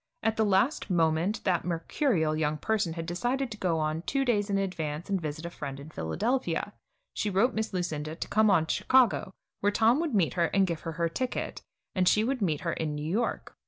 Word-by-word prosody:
At 225 0 +2
the 220 - +2
last 210 +9 +2
moment 170 +3 +1
that 180 -4 +1
mercurial 165 - 0
young 155 -1 0
person 210 -1 0
had 165 0 -5
decided 240 +9 -1
to 215 - -6
go 170 -3 +1
on 155 +1 -1
two 270 +9 0
days 210 -4 +1
in 200 - +1
advance 170 -3 -3
and 190 -2 +1
visit 155 +1 -5
a 170 - -5
friend 140 -4 -6
in 145 +3 -10
Philadelphia. 215 - -1 0.4
She 210 - -1
wrote 215 +6 +2
Miss 220 0 -2
Lucinda 160 -4 -3
to - - -5
come 215 +1 +3
on 170 -5 +4
to - - 0
Chicago, 250 -7 +3 0.3
where 205 - +2
Tom 230 +6 +4
would 320 -8 -1
meet 180 -5 +2
her 175 -2 +2
and 195 -1 +5
give 170 -3 -3
her 165 - -5
her 170 +1 0
ticket, 250 +9 -3 0.3
and 185 -1 +1
that - - +9
she 215 - +3
would 255 +1 -1
meet 160 -7 0
her 170 -2 -1
in 155 -2 -2
New 150 +1 -4
York. 220 +8 -2
185 Hz, 225 wpm, -29 LUFS, 160-220 Hz, 0.4 s, that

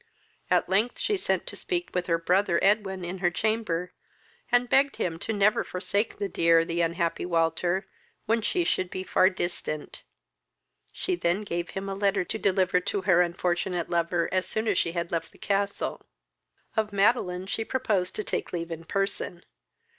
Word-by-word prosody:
At - - +3
length 210 +6 +1
she 420 - 0
sent 385 - -1
to - - -7
speak 355 -1 -3
with 180 -1 -1
her 165 -1 +3
brother 180 +1 +2
Edwin 195 -2 +2
in 180 +2 -5
her 175 -1 +3
chamber, 180 -2 -1 0.6
and 245 0 +4
begged 275 +3 +3
of 165 -1 -2
him 220 - -2
never 205 +1 +4
to - - -16
forsake 200 +4 -1
the 200 - -1
dear, 165 -2 +4
the 170 +1 -1
unhappy 170 0 0
Walter, 175 +2 +1 0.4
when 225 +1 +2
she 350 - +1
should 185 - 0
be 185 - -4
far 185 0 +4
distant. 175 -5 -4 0.9
She - - -2
then 175 +3 0
gave 175 -3 -3
him 195 +1 -3
a 195 - -2
letter 195 -1 +1
to 220 - -4
deliver 185 -2 +2
to 195 +2 -2
her 180 -2 +5
unfortunate 175 0 -1
lover 170 0 +1
as 185 0 +1
soon 220 +1 -1
as 200 -4 +3
she 170 - 0
had 170 -1 -3
left 165 -1 -2
the - - -19
castle. 200 0 -2 0.7
Of 220 -1 0
Madeline 195 -3 +2
she 225 +3 -2
proposed 215 -7 -1
taking - - -2
leave 165 0 -6
in 165 0 -6
person. 195 -2 -2
185 Hz, 175 wpm, -27 LUFS, 175-205 Hz, 0.9 s, her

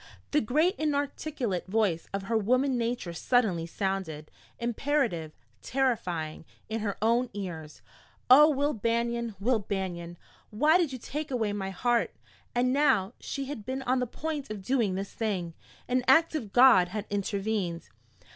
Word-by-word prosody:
The 300 - +3
great 305 - +2
inarticulate 285 - -2
voice 195 -5 0
of 195 0 -3
her 225 +3 -2
woman 255 +5 +2
nature 235 -7 -2
suddenly 185 -5 +1
sounded, 180 -5 -3 0.3
imperative, 235 - -1 0.3
terrifying, 180 -14 -1 0.3
in 225 +1 -2
her 205 -2 -3
own 235 +2 +2
ears 165 -6 -7 0.4
"Oh, 295 +5 +8
Will 290 0 +1
Banion, 235 0 -1
Will 230 +3 +2
Banion, 180 -4 -4 0.3
why 300 +11 +4
did 330 -6 +1
you 260 - -5
take 300 +5 -5
away 225 -6 -1
my 195 -2 -3
heart?" 235 +5 0 0.4
And 250 +1 +2
now 260 -8 +3
she 275 - -4
had 265 -6 -6
been 260 +4 -4
on 255 0 +1
the 250 - -1
point 300 +2 -4
of 210 -3 -6
doing 225 -4 +1
this 195 +1 -5
thing! 190 -7 -2 0.3
An 250 0 +1
act 320 +6 +5
of 240 -10 -4
God 245 -8 +7
had 205 +3 -5
intervened. 200 -3 -2
230 Hz, 150 wpm, -28 LUFS, 195-265 Hz, 0.4 s, Oh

